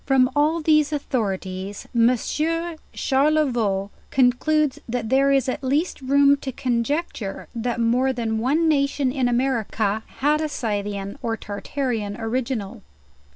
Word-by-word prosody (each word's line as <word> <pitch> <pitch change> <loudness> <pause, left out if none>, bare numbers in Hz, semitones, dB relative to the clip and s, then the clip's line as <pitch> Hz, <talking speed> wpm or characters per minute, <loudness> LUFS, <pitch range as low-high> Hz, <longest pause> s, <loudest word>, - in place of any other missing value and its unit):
From 265 -2 +3
all 310 +3 +2
these 305 -1 +3
authorities 200 -8 -3
Monsieur 310 +8 +1 0.2
Charlevoix 260 -9 +1 0.2
concludes, 270 +3 +2
that 230 -2 -2
there 275 +2 +4
is 270 -2 +2
at 255 - -3
least 290 +5 0
room 280 +1 +4
to 270 -1 -5
conjecture 245 - -2
that 240 0 -2
more 245 +3 +2
than 225 -3 -2
one 295 +8 +2
nation 280 -3 +1
in 260 -2 0
America 230 -4 0 0.2
had 300 +3 +2
a 310 - -1
Scythian 205 -6 -3
or 225 -1 -2
Tartarian 220 0 -3
original. 230 -2 -3
255 Hz, 125 wpm, -23 LUFS, 225-285 Hz, 0.2 s, there